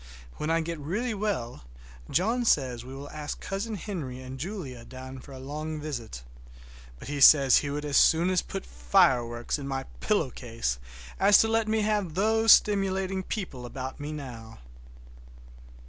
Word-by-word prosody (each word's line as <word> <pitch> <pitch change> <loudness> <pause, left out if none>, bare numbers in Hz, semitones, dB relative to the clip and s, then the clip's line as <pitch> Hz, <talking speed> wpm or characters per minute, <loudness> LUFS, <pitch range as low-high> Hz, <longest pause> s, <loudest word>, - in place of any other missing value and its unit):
When 150 - -3
I 165 0 +2
get 165 0 -4
really 210 - -2
well 195 - -3 0.5
John 225 +8 +1
says 130 - +1
we 130 +2 -9
will 140 +1 -8
ask 150 -1 -6
Cousin 205 +3 -4
Henry 165 - -5
and 130 0 -8
Julia 150 - -6
down 130 +2 -9
for 140 - -14
a 135 - -9
long 150 +4 -5
visit; 120 - -6 0.7
but - - -11
he 145 0 -3
says 135 -2 +8
he 145 - -1
would 145 +1 -3
as 145 -1 +1
soon 175 +3 +4
put - - -5
fire - - +3
works 120 +4 -4
in 140 - -6
my 135 -1 -2 0.2
pillow 200 - +1
case 115 - -3 0.4
as 200 +1 +7
to 225 - +2
let 225 0 +1
me 220 0 +1
have 205 -6 0
those 220 +3 +4
stimulating 195 -2 +3
people 180 - -5
about 130 +2 -6
now. 130 -7 -7
150 Hz, 160 wpm, -28 LUFS, 130-195 Hz, 0.7 s, says